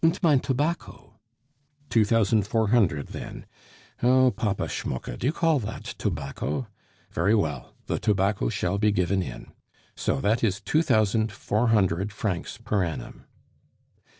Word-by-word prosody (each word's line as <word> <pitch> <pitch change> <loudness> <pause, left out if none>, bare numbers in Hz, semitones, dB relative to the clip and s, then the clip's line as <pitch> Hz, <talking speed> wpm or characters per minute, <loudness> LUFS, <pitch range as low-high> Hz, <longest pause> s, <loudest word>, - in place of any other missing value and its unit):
"Und 165 +3 +4
mein 150 -5 +5
tobacco." 145 +7 -3 0.7
"Two 115 -3 +5
thousand 110 -2 +2
four 110 -1 +1
hundred, 95 -12 +2
then.... - - -8 0.6
Oh! 130 +1 +5
Papa 105 -4 -1
Schmucke, 65 -1 -4
do 120 - -2
you - - +3
call 165 -2 +2
that 110 -2 -6
tobacco? 75 - -3 0.5
Very 100 +7 +2
well, 75 - -2
the - - -2
tobacco 95 - +1
shall 90 +8 -1
be 105 0 +3
given 95 0 +1
in. - - -7 0.4
So - - -1
that 110 +4 +1
is 105 -2 +1
two 105 - +1
thousand 110 -5 +2
four 105 +4 0
hundred 100 -3 +2
francs 100 -4 -3
per 100 -3 0
annum." 80 -3 -6
105 Hz, 145 wpm, -26 LUFS, 95-120 Hz, 0.7 s, mein